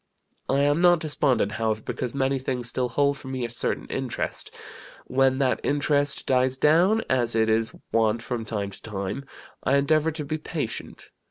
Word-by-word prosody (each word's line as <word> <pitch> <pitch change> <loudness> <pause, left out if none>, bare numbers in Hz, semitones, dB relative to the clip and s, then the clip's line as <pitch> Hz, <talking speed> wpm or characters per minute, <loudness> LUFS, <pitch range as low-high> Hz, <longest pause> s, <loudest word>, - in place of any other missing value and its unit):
I 135 +1 +3
am 145 +3 +2
not 175 -1 +6
despondent, 145 -8 +1
however, 110 -1 -1
because 125 +1 -4
many 135 0 +1
things 125 -2 -2
still 125 +1 -1
hold 140 +3 +1
for - - -11
me 130 -2 -3
a 120 - -6
certain 120 - -2
interest. 130 -3 -3 0.6
When 130 0 +2
that 135 -2 +1
interest 145 0 +2
dies 130 0 +2
down, 175 +10 +4
as 120 -3 +1
it 110 0 +3
is 110 +2 +1 0.2
wont 115 0 +2
from 120 -3 -3
time 105 -3 -3
to - - -12
time, 100 +5 -5 0.4
I 135 - +2
endeavor 155 +3 +2
to 150 -1 -5
be 155 +2 -3
patient. 150 -7 -5
130 Hz, 175 wpm, -25 LUFS, 115-145 Hz, 0.6 s, not